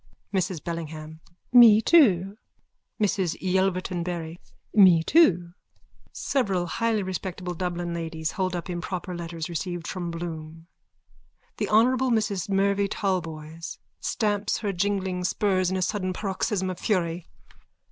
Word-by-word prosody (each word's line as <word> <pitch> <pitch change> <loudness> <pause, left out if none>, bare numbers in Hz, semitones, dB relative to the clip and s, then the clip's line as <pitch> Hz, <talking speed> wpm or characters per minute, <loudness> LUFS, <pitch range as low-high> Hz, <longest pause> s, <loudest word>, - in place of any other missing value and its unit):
MRS 185 -4 -1
BELLINGHAM: 160 -2 -6 0.3
Me 230 -4 +9
too. 205 - +4 0.6
MRS 195 -5 0
YELVERTON 185 -1 0
BARRY: 170 -1 -5 0.3
Me 185 -6 +7
too. 175 - +4 0.6
(Several 200 -10 0
highly 220 +3 0
respectable 185 -1 -4
Dublin 175 0 -3
ladies 160 -1 -3
hold 185 -3 -2
up 175 - -4
improper 180 0 -4
letters 165 -2 -5
received 175 0 -4
from 175 -2 -4
Bloom.) 165 -1 -7 0.9
THE - - -2
HONOURABLE 255 +4 +4
MRS 210 -5 0
MERVYN 200 +1 +2
TALBOYS: 165 -5 -4 0.2
_(Stamps 210 -2 0
her 205 -3 -1
jingling 190 -1 -1
spurs 185 -1 +1
in 190 - -1
a 185 - 0
sudden 185 -2 -1
paroxysm 190 -1 -2
of 180 - -8
fury.) 175 -5 -1
185 Hz, 120 wpm, -26 LUFS, 170-200 Hz, 0.9 s, Me